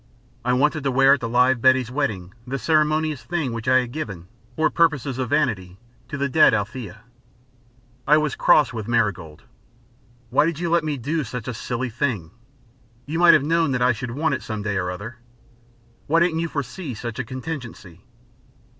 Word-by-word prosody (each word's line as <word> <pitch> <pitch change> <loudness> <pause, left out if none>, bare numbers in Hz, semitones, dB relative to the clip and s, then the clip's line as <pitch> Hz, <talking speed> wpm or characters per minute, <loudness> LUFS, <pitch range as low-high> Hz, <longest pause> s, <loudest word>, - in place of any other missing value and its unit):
I 125 +1 +1
wanted 150 +3 +1
to - - +2
wear 135 +1 +5
at 140 - +1
the 115 - -4
live 125 +1 +3
Betty's 130 -1 +3
wedding 105 -10 -3
the 135 +2 -2
ceremonious 155 0 +1
thing 145 -3 -2
which 115 0 -6
I 130 0 +5
had 125 -1 -7
given, 100 - -6 0.3
for 155 -1 +1
purposes 145 -6 +1
of 130 -3 -2
vanity, 105 -12 -1 0.3
to 140 - -5
the 140 0 0
dead 155 +4 +5
Althea. 105 -1 -5 1.0
I 150 - +6
was 150 -2 0
cross 150 -8 +4
with 110 -3 -5
Marigold. 100 -10 -1 0.9
"Why 150 - +3
did 165 -3 -2
you 170 0 -2
let 170 -1 +3
me 150 -2 -2
do 150 +6 -2
such 120 -1 -7
a 125 - -3
silly 120 +2 -4
thing? 110 - -2 0.7
You 160 +3 -3
might 175 -1 +7
have - - +2
known 160 -2 +1
that 125 - -1
I 125 - +4
should 120 +3 -6
want 150 +7 -1
it - - -2
some 110 -2 -5
day 100 -1 -2
or 90 -1 -1
other. 105 +7 -7 0.9
Why 165 +3 +3
didn't 170 -1 +1
you 170 - -1
foresee 145 -1 -5
such 120 +2 -6
a - - -1
contingency?" 120 - -8
130 Hz, 190 wpm, -22 LUFS, 115-150 Hz, 1.0 s, might